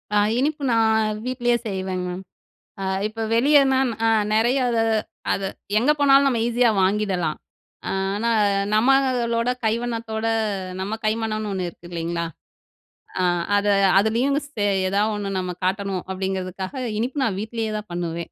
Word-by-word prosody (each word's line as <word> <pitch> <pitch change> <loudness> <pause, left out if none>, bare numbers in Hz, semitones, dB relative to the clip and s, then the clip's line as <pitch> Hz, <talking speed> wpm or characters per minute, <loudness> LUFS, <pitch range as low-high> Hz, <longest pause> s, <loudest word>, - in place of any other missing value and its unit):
அ - - +5 0.2
இனிப்பு 290 +2 -1
நான் 220 -1 +2
வீட்டுலேயே 245 -1 +1
செய்வேங்க 190 -2 -3
மேம். 180 +2 -6 0.6
அ - - -3 0.2
இப்போ 225 +1 -5
வெளியேனா 270 +2 +4 0.3
அ - - +4 0.2
நெறைய 235 +5 +3
அத 230 - 0 0.5
அத - - -1 0.4
எங்க 250 +7 +2
போனாலும் 280 0 +6
நம்ம 240 -4 0
ஈஸியா 240 0 +3
வாங்கிடலாம். 185 -5 0 0.5
ஆனா, 195 +4 -1 0.4
நம்பளோட 245 0 +2
கைவண்ணத்தோட 225 0 -2 0.5
நம்ம 200 +4 -3
கைமனம்னு, 215 -1 -1
1 185 -2 -2
இருக்கு 175 0 -13
இல்லங்களா? 170 0 -2 1.0
அ - - +1 0.3
அத 205 0 0 0.3
அதுலயும் 235 +7 +1
சே 225 -8 -3 0.2
எதாவது 205 +3 +1
ஒண்ணு 200 -1 -3
நம்ம 180 -1 -3
காட்டணும் 195 -1 -1
அப்படிங்குறதுக்காக 190 +5 -4
இனிப்பு 255 +5 -2
நான் 195 -5 -1
வீட்டுலேயே 225 0 -3
தான் 210 -1 -8
பண்ணுவேன். 170 -1 -4
220 Hz, 130 wpm, -23 LUFS, 190-240 Hz, 1.0 s, போனாலும்